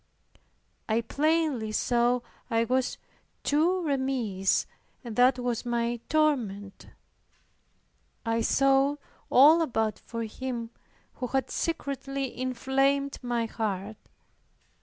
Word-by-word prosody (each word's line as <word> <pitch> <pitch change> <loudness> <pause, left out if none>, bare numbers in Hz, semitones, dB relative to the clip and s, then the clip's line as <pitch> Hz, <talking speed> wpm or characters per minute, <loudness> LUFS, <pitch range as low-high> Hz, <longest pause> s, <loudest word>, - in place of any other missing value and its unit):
I 220 +2 +2
plainly 290 -3 0
saw 240 +2 +2 0.3
I 230 0 +2
was 255 +2 0 0.5
too 345 +5 +2
remiss; 260 - 0 0.4
and 235 -3 -7
that 250 +2 +5
was 245 -2 -2
my 240 -1 -1
torment. 235 -11 0 1.4
I 230 0 +1
sought 275 +3 +3 0.3
all 305 +6 +7
about 225 -8 0
for 230 -1 -5
Him 235 +1 -5 0.4
who 250 - -4
had 265 +1 -1
secretly 275 -4 -3
inflamed 270 +2 0
my 240 -2 -1
heart. 215 -2 -3
250 Hz, 95 wpm, -28 LUFS, 230-275 Hz, 1.4 s, all